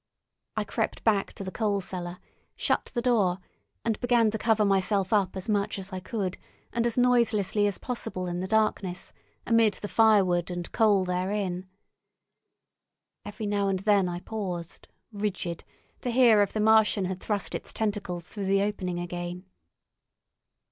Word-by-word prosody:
I -, -, +1 dB
crept -, -, -3 dB
back 205 Hz, -3 st, +2 dB
to -, -, -7 dB
the 185 Hz, -, -5 dB
coal 205 Hz, -2 st, 0 dB
cellar, 180 Hz, -1 st, -5 dB, 0.4 s
shut -, -, +1 dB
the 240 Hz, -, 0 dB
door, 210 Hz, -8 st, +3 dB, 0.5 s
and 220 Hz, -, 0 dB
began 240 Hz, -3 st, +3 dB
to 220 Hz, -, -3 dB
cover 220 Hz, -2 st, +3 dB
myself 195 Hz, 0 st, +1 dB
up 195 Hz, -3 st, +2 dB
as 185 Hz, -, -6 dB
much 205 Hz, -2 st, 0 dB
as 195 Hz, 0 st, -7 dB
I 185 Hz, -, -3 dB
could, 190 Hz, -1 st, -3 dB, 0.3 s
and 235 Hz, 0 st, +1 dB
as 235 Hz, -, -2 dB
noiselessly 225 Hz, -5 st, +3 dB
as 200 Hz, -, -2 dB
possible 225 Hz, -7 st, -4 dB
in 175 Hz, 0 st, -3 dB
the 185 Hz, -, -3 dB
darkness, 205 Hz, -4 st, 0 dB, 0.3 s
among 230 Hz, -2 st, +5 dB
the 205 Hz, -, -5 dB
firewood 195 Hz, -6 st, +3 dB
and 175 Hz, -1 st, -5 dB
coal 205 Hz, -4 st, +3 dB
therein. 185 Hz, 0 st, -2 dB, 1.6 s
Every 210 Hz, +2 st, -6 dB
now 205 Hz, -1 st, 0 dB
and 195 Hz, -1 st, +1 dB
then 195 Hz, -1 st, +2 dB
I 175 Hz, 0 st, -5 dB
paused, 180 Hz, -6 st, -5 dB, 0.3 s
rigid, 195 Hz, -5 st, -3 dB, 0.4 s
to 245 Hz, -, -2 dB
hear 235 Hz, -3 st, +6 dB
if 200 Hz, -, +1 dB
the 215 Hz, -, -3 dB
Martian 220 Hz, -2 st, +4 dB
had 185 Hz, 0 st, -3 dB
thrust 205 Hz, 0 st, -2 dB
its -, -, -5 dB
tentacles 200 Hz, -5 st, -3 dB
through 205 Hz, -3 st, -5 dB
the 195 Hz, +1 st, +3 dB
opening 190 Hz, -4 st, -2 dB
again. 175 Hz, +1 st, -5 dB
200 Hz, 160 wpm, -27 LUFS, 185-220 Hz, 1.6 s, hear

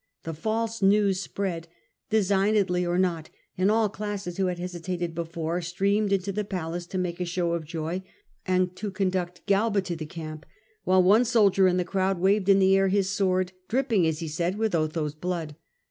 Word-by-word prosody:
The 165 Hz, -, -4 dB
false 220 Hz, +7 st, -2 dB
news 200 Hz, -1 st, +3 dB
spread, 180 Hz, -5 st, -4 dB, 0.4 s
designedly 200 Hz, -3 st, +2 dB
or 175 Hz, +1 st, 0 dB
not, 170 Hz, -4 st, 0 dB, 0.3 s
and 185 Hz, +2 st, +2 dB
all 220 Hz, 0 st, +3 dB
classes 205 Hz, -3 st, -5 dB
who 190 Hz, -1 st, +1 dB
had 180 Hz, -1 st, -2 dB
hesitated 175 Hz, -1 st, -4 dB
before 165 Hz, +1 st, -3 dB
streamed 200 Hz, +4 st, 0 dB
into 195 Hz, 0 st, 0 dB
the 210 Hz, +2 st, -2 dB
palace 175 Hz, -3 st, -4 dB
to 185 Hz, -, -4 dB
make 180 Hz, -1 st, -2 dB
a -, -, 0 dB
show 175 Hz, 0 st, -1 dB
of 170 Hz, -2 st, -2 dB
joy, 165 Hz, +3 st, -3 dB, 0.4 s
and 185 Hz, -1 st, 0 dB
to 210 Hz, -, -3 dB
conduct 185 Hz, -2 st, -2 dB
Galba 205 Hz, 0 st, +2 dB
to 175 Hz, -2 st, -4 dB
the 155 Hz, -2 st, -6 dB
camp, 155 Hz, -2 st, -8 dB, 0.4 s
while 185 Hz, 0 st, +4 dB
one 205 Hz, +6 st, +5 dB
soldier 205 Hz, -5 st, +4 dB
in 180 Hz, 0 st, +2 dB
the 180 Hz, -, 0 dB
crowd 190 Hz, +1 st, 0 dB
waved 195 Hz, +2 st, +2 dB
in 195 Hz, -, +7 dB
the 190 Hz, 0 st, +5 dB
air 195 Hz, 0 st, +3 dB
his 195 Hz, 0 st, +1 dB
sword, 185 Hz, -2 st, +1 dB, 0.2 s
dripping, 230 Hz, -8 st, +2 dB
as 160 Hz, 0 st, -2 dB
he 165 Hz, -, -3 dB
said, 170 Hz, +5 st, -2 dB
with 220 Hz, -2 st, 0 dB
Otho's 155 Hz, -2 st, -1 dB
blood. 165 Hz, -2 st, -4 dB
185 Hz, 190 wpm, -26 LUFS, 170-200 Hz, 0.4 s, in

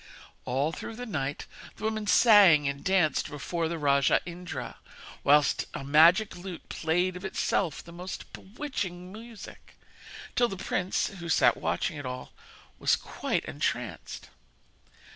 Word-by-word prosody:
All 135 Hz, +5 st, 0 dB
through 220 Hz, +7 st, -7 dB
the 245 Hz, +2 st, -6 dB
night 145 Hz, -, -3 dB, 0.3 s
the -, -, -12 dB
women 220 Hz, -1 st, -2 dB
sang 200 Hz, -, +7 dB
and 140 Hz, 0 st, -3 dB
danced 190 Hz, -5 st, +2 dB
before 165 Hz, +3 st, -3 dB
the 170 Hz, +1 st, -3 dB
rajah 140 Hz, -2 st, +3 dB
Indra, 175 Hz, 0 st, -7 dB, 0.5 s
whilst 145 Hz, +1 st, +4 dB
a -, -, -5 dB
magic 165 Hz, +9 st, +5 dB
lute 180 Hz, -1 st, -9 dB
played 175 Hz, +3 st, 0 dB
of 180 Hz, -, -8 dB
itself 190 Hz, -3 st, -1 dB
the 170 Hz, -, -13 dB
most 180 Hz, +2 st, -8 dB
bewitching 190 Hz, -6 st, -5 dB
music; 225 Hz, 0 st, -12 dB, 0.6 s
till 240 Hz, -, +4 dB
the 195 Hz, -, -6 dB
prince, 180 Hz, 0 st, -1 dB
who 170 Hz, -1 st, -6 dB
sat -, -, +4 dB
watching 160 Hz, -, -2 dB
it 145 Hz, -, -7 dB
all, 125 Hz, 0 st, -6 dB, 0.5 s
was -, -, +3 dB
quite -, -, -3 dB
entranced. -, -, -4 dB
175 Hz, 140 wpm, -28 LUFS, 150-195 Hz, 0.6 s, sang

